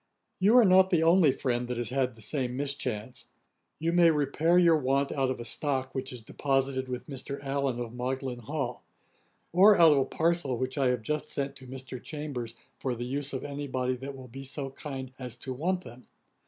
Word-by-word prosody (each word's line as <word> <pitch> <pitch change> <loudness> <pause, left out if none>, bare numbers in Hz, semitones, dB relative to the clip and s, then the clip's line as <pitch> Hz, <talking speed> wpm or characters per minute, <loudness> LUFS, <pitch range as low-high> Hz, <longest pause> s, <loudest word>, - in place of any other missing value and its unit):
You 210 +6 +5
are 240 - +8
not 190 0 +6
the 170 -3 +3
only 165 -3 +6
friend 125 -2 -1
that 125 -1 -3
has 120 -1 -2
had 130 -2 0
the 110 - -9
same 125 -1 -2
mischance. 130 -5 -3 0.5
You 165 +2 -1
may 175 -1 +6
repair 155 +3 +2
your 170 -2 +6
want 140 0 +1
out 135 -2 0
of 130 - -3
a 120 - -6
stock, 130 0 -2
which 130 0 -4
is 125 -3 -8
deposited 135 +1 0
with 125 -1 -4
Mr. 140 0 -5
Allen, 135 -3 -1
of 120 -1 -5
Magdalen 125 0 -3
Hall; 125 0 -4 0.7
or 200 +4 +7
out 165 -2 +8
of 145 - +4
a 135 - +2
parcel 160 -4 0
which 130 +1 -2
I 135 -2 +2
have 125 -3 0
just 150 +6 -2
sent 140 0 -3
to 130 - -13
Mr. 130 -1 -8
Chambers 135 -7 -5 0.2
for 130 -2 -2
the 120 +1 -4
use 140 +2 -3
of 130 - -4
any 145 0 -5
body 130 -1 -1
that 135 +2 -7
will 130 -1 -10
be 135 +3 -9
so 135 0 -5
kind 135 -2 -7
as 125 -2 -5
to 130 +1 -6
want 180 +7 -1
them. 120 -2 -13
135 Hz, 210 wpm, -29 LUFS, 125-150 Hz, 0.7 s, are